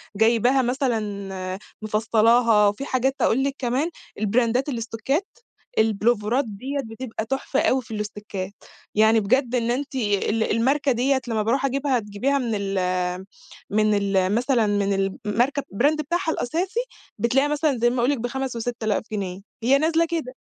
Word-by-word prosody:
جايباها 235 +5 +3
مثلًا 205 -7 -2 0.2
مِفصّلاها، 220 0 +3
وفي 205 +7 -2
حاجات 265 0 0
أقول 265 +4 +3
لِك 275 -1 -1
كمان، 260 +6 0 0.3
البراندات 235 +5 +1
الستوكّات، 245 - -2 0.5
البُلوفَرات 220 +3 +2
ديّة 255 +7 -5
بتبقى 225 0 -5
تُحْفة 270 +2 -1
أوي 260 0 +2
في 225 -1 -10
الستوكّات، 205 -2 -5 0.4
يعني 220 +1 +5
بجد 250 +4 +1
إن 235 -1 +1
أنتِ 270 +2 -3
ال 215 -1 +1
الماركة 270 +5 +2
ديّة 260 +2 +1
لمّا 220 -2 0
بارُوح 265 +5 +1
أجيبها 275 -1 +1
تجيبيها 215 +7 -1
من 240 -4 -1
ال 195 -1 -1 0.9
من 215 0 +2
ال 195 -1 +1
مثلًا 240 -2 +2
من 200 -1 +1 0.3
الماركة 245 +7 +1
brand 290 +8 +3
بتاعها 340 +3 -1
الأساسي 355 - -2 0.4
بتلاقيها 265 +4 +2
مثلًا 295 -2 +1
زي 240 +1 +3
ما 245 +1 -2
أقول 240 +3 +2
لك 285 - 0
ب5 255 +2 -3
و6 235 0 -4
آلاف 215 -1 0
جنيه، 190 -3 -3 0.2
هي 265 +4 +5
نازلة 325 +3 +2
كده، 315 -7 -3
235 Hz, 150 wpm, -23 LUFS, 215-270 Hz, 0.9 s, يعني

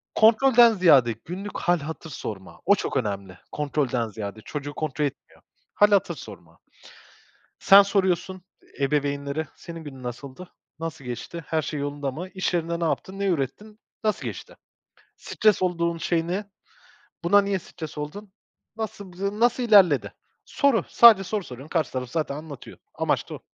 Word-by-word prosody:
Kontrolden 235 +2 +6
ziyade 145 - +5
günlük 195 +4 -6
hâl 175 -1 +2
hatır 160 +2 -7
sorma. 105 -7 -7
O 200 - +6
çok 140 - -3
önemli. 100 -5 -3
Kontrolden 135 -5 -1
ziyade 110 0 -7
çocuğu 145 +2 -6
kontrol 150 -1 -2
etmiyor. 140 - -8 0.3
Hâl 205 - +5
hatır 185 -4 +2
sorma. 85 - -12 1.0
Sen 200 +1 +8
soruyorsun 190 -2 0 0.4
ebeveynlere, 140 +2 -1
"Senin 165 -1 -9
günün 135 -3 -10
nasıldı? 130 +8 -8 0.3
Nasıl 160 -4 -6
geçti? 125 +7 -6
Her 160 -1 0
şey 150 0 -4
yolunda 145 -1 -3
mı? 175 +8 -7
İş 185 -1 -1
yerinde 170 0 -1
ne - - 0
yaptın? 190 +4 -2
Ne 200 - -1
ürettin? 195 - -3 0.2
Nasıl 215 - 0
geçti? - - -7 0.6
Stres 215 -3 +1
olduğun 170 -2 0
şey 165 -1 0
ne? 200 +4 -3 0.7
Buna 205 +4 +6
niye 200 -1 -1
stres 160 -3 -9
oldun? 190 +7 -7 0.4
Nasıl, 205 -4 -6
b 200 +4 -4
nasıl 245 +1 +3
ilerledi?" 195 - +5 0.3
Soru, 280 -5 +2
sadece 220 -5 +7
soru 205 +1 -3
soruyorsun. 130 +2 -10
Karşı 160 -4 0
taraf 125 -1 -4
zaten 150 -3 -2
anlatıyor. 150 -4 -10 0.2
Amaç - - -1
da - - -5
o. - - -9
165 Hz, 155 wpm, -25 LUFS, 140-195 Hz, 1.0 s, Sen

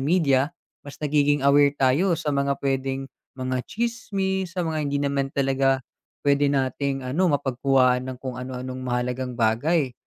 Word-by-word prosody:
media, 140 -3 +2 0.3
mas 145 - -11
nagiging 145 -1 +2
aware 145 0 +5
tayo 155 +8 +3
sa 150 -2 -2
mga 140 0 +1
pwedeng 135 0 -1 0.3
mga 130 -1 -2
chismis, 195 -5 -2
sa 180 - 0
mga 160 -1 -2
hindi 140 - 0
naman 140 -1 0
talaga 135 -1 +1 0.4
pwede 140 0 +3
nating 135 0 -1
ano 170 +8 +1
mapagkuha 130 -2 +2
ng 130 0 -6
kung 125 -1 -6
ano-anong 130 0 -6
mahalagang 125 0 -2
bagay. 125 +5 +1
135 Hz, 145 wpm, -24 LUFS, 130-145 Hz, 0.4 s, aware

